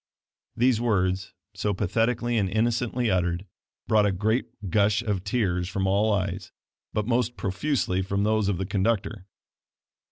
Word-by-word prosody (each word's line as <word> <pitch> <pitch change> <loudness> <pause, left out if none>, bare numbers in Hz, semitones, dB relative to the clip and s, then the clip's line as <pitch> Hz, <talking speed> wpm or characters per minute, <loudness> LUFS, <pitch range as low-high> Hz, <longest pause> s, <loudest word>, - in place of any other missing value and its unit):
These 120 -1 +3
words, 95 -5 0 0.2
so 105 -2 -1
pathetically 115 +5 0
and 100 -4 +1
innocently 120 +2 0
uttered, 90 0 0 0.4
brought 105 -1 +4
a - - +2
great 110 +6 0 0.2
gush 105 +1 +3
of 100 -4 -1
tears 95 -5 0
from 95 +1 -1
all 100 +3 +2
eyes, 95 -2 -2 0.4
but 105 - -1
most 120 0 0
profusely 95 -1 0
from 100 +1 -1
those 110 -1 +2
of 100 - 0
the 95 - -2
conductor. 100 0 -1
105 Hz, 140 wpm, -26 LUFS, 95-115 Hz, 0.4 s, brought